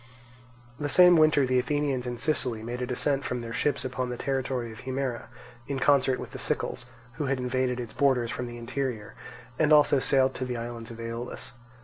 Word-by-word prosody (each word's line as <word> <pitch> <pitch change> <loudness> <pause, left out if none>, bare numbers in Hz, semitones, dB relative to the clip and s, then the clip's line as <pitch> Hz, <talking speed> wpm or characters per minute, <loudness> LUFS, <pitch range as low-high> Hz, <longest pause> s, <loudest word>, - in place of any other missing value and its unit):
The 145 -1 -2
same 180 +1 +7
winter 155 -3 +5
the 130 0 +2
Athenians 135 -1 -1
in 120 -1 -4
Sicily 125 -4 0
made 120 +2 -5
a 125 - -2
descent 135 +2 0
from 125 -2 -3
their 115 0 -6
ships 135 0 0
upon 130 -1 -3
the 125 - -4
territory 130 -3 -2
of 110 - -11
Himera, 130 -2 -3 0.4
in 140 - -2
concert 135 -1 +3
with - - -7
the - - -8
Sicels, 120 - -2 0.3
who 150 - -1
had 135 0 0
invaded 125 0 -1
its 120 -2 -6
borders 130 -4 +2
from 125 - -4
the 120 0 -8
interior, 120 -2 -4 0.5
and 155 -1 +3
also 150 -2 +6
sailed 130 0 +3
to - - -4
the 125 -1 -3
islands 115 0 -6
of 115 -1 -10
Aeolus. 115 +2 -4
130 Hz, 200 wpm, -27 LUFS, 120-140 Hz, 0.5 s, same